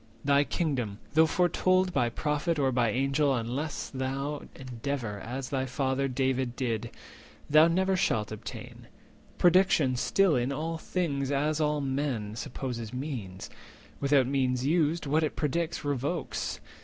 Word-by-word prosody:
Thy 140 0 +4
kingdom, 130 - -2 0.2
though 160 +1 +6
foretold 185 +1 +2
By 120 - +2
Prophet 150 +6 -1
or 135 -2 +2
by 120 -2 +2
Angel, 135 +4 +2
unless 130 +6 -3
thou 135 +2 -3
Endeavour, 125 -4 -4
as 125 +5 -5
thy 135 -1 -1
father 130 +1 0
David 130 -1 0
did, 115 -3 -2 0.6
Thou 155 +2 +7
never 190 +3 +2
shalt 110 - 0
obtain: 110 - -8 0.5
prediction 175 -7 +4
still 185 +6 +3
In 125 +2 0
all 160 +4 -3
things, 145 -7 -1
and 150 +2 0
all 150 -1 +1
men, 130 -6 -2
supposes 120 -3 -5
means; 125 -9 -5 0.5
Without 140 -2 +3
means 130 -1 0
used, 160 +1 +1
what 150 +3 +2
it 155 - -1
predicts 165 +2 -1
revokes. 145 +4 -2
140 Hz, 135 wpm, -29 LUFS, 125-155 Hz, 0.6 s, Thou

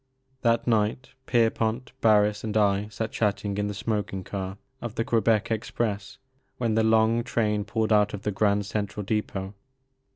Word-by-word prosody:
That 115 -2 +2
night, 115 +2 +1 0.2
Pierpont, 115 +1 +1
Barris, 105 -1 +4
and 110 -1 -1
I 100 -1 +2
sat 110 +1 -4
chatting 100 -1 -1
in 105 - 0
the 105 - -4
smoking 100 -2 -2
car 95 0 -5 0.2
of 120 -2 -5
the 115 - -1
Quebec 115 -1 +2
Express 105 -2 -2 0.4
when 115 -3 0
the 110 - +3
long 110 +1 +3
train 105 -4 0
pulled 110 +1 0
out 105 0 +4
of 100 - -10
the 105 - 0
Grand 100 0 +1
Central 105 0 -3
Depot. 100 -2 -2
105 Hz, 160 wpm, -26 LUFS, 100-115 Hz, 0.4 s, Barris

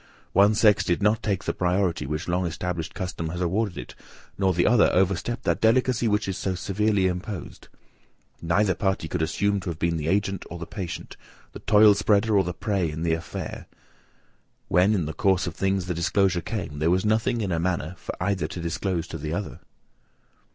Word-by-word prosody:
One 100 +2 +5
sex 105 -1 +4
did 90 +3 0
not 110 +2 +3
take 100 -4 -1
the - - -1
priority 90 -3 0
which 75 +3 -3
long 90 +1 0
established 85 0 -4
custom 85 -4 -4
has 85 +2 -5
awarded 90 +2 -1
it, - - -7 0.4
nor 95 -1 +2
the 85 -1 +1
other 115 0 +5
overstep 95 +6 0
that - - 0
delicacy 120 +1 +3
which 105 -1 +1
is 95 - -2
so 95 -1 -1
severely 100 +2 0
imposed. 90 +1 -4 0.7
Neither 95 +4 +2
party 95 -3 -1
could 80 - -3
assume 100 +6 0
to 95 -1 -5
have 85 - -4
been 85 0 0
the 75 -1 -3
agent 100 +1 0
or 85 - -6
the 85 - -6
patient, 85 -1 -7 0.4
the - - -8
toil 105 -1 +6
spreader 105 +2 +2
or 100 - +4
the 90 - -3
prey 95 -1 -1
in 80 +2 -5
the 85 -1 +1
affair. 80 +1 -5 1.0
When 95 +5 +4
in 90 -6 0
the 80 - -4
course 95 +1 +2
of - - -4
things 95 -1 0
the 90 - -2
disclosure 90 +1 +1
came, 85 -8 -5
there 80 +2 +2
was 90 +3 +2
nothing 115 +2 +1
in 100 -3 -2
a 85 - 0
manner 90 -1 -1
for - - -6
either 95 -4 0
to 90 - -7
disclose 85 +1 -2
to 80 - -6
the 75 +2 -4
other." 100 0 -5
95 Hz, 200 wpm, -25 LUFS, 85-100 Hz, 1.0 s, toil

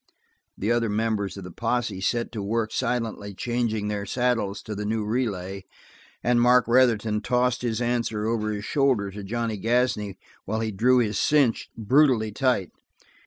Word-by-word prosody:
The 105 +4 -1
other 120 -1 +1
members 105 -2 -1
of 100 - -7
the 90 - -8
posse 115 -1 -2
set 115 +4 -1
to 110 - -4
work 110 +2 -1
silently 115 -5 -2
changing 115 -2 -1
their 105 -1 -3
saddles 120 -4 0
to 110 - -5
the 105 0 -4
new 110 0 -1
relay, 100 -5 -2 0.6
and 120 -1 +3
Mark 125 0 +5
Retherton 115 -4 +3
tossed 125 +2 +1
his 115 -2 -1
answer 120 -3 -1
over 110 -1 0
his 105 -1 -4
shoulder 130 -9 +1
to 100 +1 -8
Johnny 115 +1 -3
Gasney 115 -3 0 0.3
while 110 +3 -2
he 110 -1 -1
drew 125 +6 +3
his 110 -4 +1
cinch 140 -7 +2
brutally 120 -1 +3
tight. 105 -4 0
110 Hz, 165 wpm, -25 LUFS, 105-120 Hz, 0.6 s, Mark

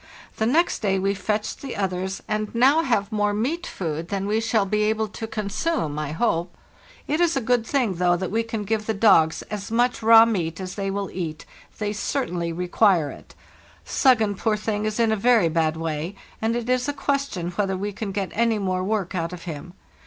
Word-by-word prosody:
The 220 - +1
next 330 +8 +2
day 195 -3 +1
we 195 +1 +1
fetched 210 +1 -2
the 270 -3 -6
others, 190 -1 -2
and 215 +1 -2
now 270 +7 +5
have 230 -8 0
more 210 -1 +1
meat 295 +11 -2
food 165 -2 -4
than 195 -1 -2
we 215 +2 +1
shall 225 -2 +1
be 210 +2 0
able 220 0 0
to 225 +2 -6
consume, 210 - -2
I 150 -1 -3
hope. 170 -1 -1 0.5
It 305 +4 0
is 335 -3 +3
a - - +3
good 245 -1 +1
thing, 250 -8 +1
though, 175 0 +3
that 185 0 -4
we 225 +2 +1
can 225 -2 -4
give 215 +1 -2
the 220 - 0
dogs 190 -7 +4
as 205 -2 -6
much 240 +2 +1
raw 225 0 +8
meat 175 -7 -2
as 185 -1 -5
they 195 -1 -3
will 200 0 -3
eat; 160 -4 -5 0.3
they 210 -1 -2
certainly 180 - -2
require 180 -1 +2
it. - - -14 0.5
*'Suggen,' 220 -7 +3
poor 215 -1 +1
thing, 210 0 -2
is 215 +1 -2
in 230 -1 +3
a - - +3
very 220 -4 +4
bad 160 -1 +1
way, 165 +3 -3 0.3
and 225 +1 +1
it 240 -1 -3
is 255 +2 +1
a - - -1
question 275 -11 -2
whether 190 +1 -1
we 205 +2 -3
can 205 0 -4
get 195 -1 -3
any 230 -1 +2
more 185 -2 -1
work 200 -2 -1
out 170 -2 -2
of 175 - -8
him. 170 +1 -7
205 Hz, 210 wpm, -24 LUFS, 185-230 Hz, 0.5 s, raw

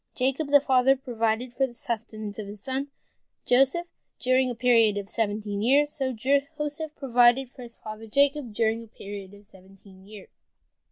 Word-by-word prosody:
Jacob 270 +4 0
the 285 0 +6
father 265 -1 +3
provided 240 -2 -2
for 270 +2 +1
the 240 - -14
sustenance 220 -2 -5
of 210 - -5
his 205 +1 -9
son 265 +4 -3 0.6
Joseph 270 +7 +3 0.3
during 255 0 +2
a 245 - -4
period 230 -3 +4
of 200 -1 -4
seventeen 205 -1 -2
years, 285 +6 +3
so 265 -3 -2
Joseph 275 +4 +1
the 295 -1 -1
son 315 +1 -6
provided 245 0 +3
for 255 - -13
his 235 -1 -10
father 215 +1 -9
Jacob 280 +1 +1
during 225 +1 0
a - - -14
period 200 -2 -9
of 205 0 -17
seventeen 190 0 -18
years. 210 -2 -12
240 Hz, 175 wpm, -26 LUFS, 215-270 Hz, 0.6 s, the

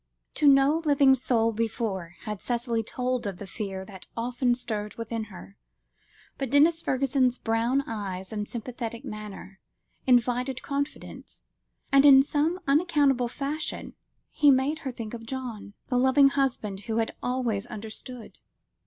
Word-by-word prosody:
To 295 - +2
no 275 +3 +5
living 280 -3 +5
soul 235 -3 +2
before, 215 -6 -3
had 210 -4 -6
Cicely 235 -1 -1
told 250 +1 -2
of 195 -3 -5
the 200 - -8
fear 195 -2 -5
that 190 -2 -9
often 245 +1 +1
stirred 215 -4 -4
within 230 -1 -4
her, 200 0 -12 0.8
but 270 -2 -2
Denis 320 +5 +4
Fergusson's 260 -2 +1
brown 230 +5 +1
eyes 190 -3 -5
and 210 -1 -3
sympathetic 235 -1 -6
manner, 210 -2 -8 0.5
invited 250 +1 +2
confidence, 285 +1 -5 0.5
and 275 0 +6
in 270 -2 +9
some 310 +5 0
unaccountable 280 -4 +3
fashion 285 +5 -4 0.4
he 295 -1 +4
made 275 +3 +3
her 270 - -4
think 230 -2 -7
of 230 -1 -8
John, 235 -6 -6
the 250 -2 +2
loving 265 +2 +5
husband 245 -8 -1
who 220 - 0
had 225 -1 -1
always 245 -4 -1
understood. 225 +2 -8
245 Hz, 140 wpm, -27 LUFS, 220-275 Hz, 0.8 s, in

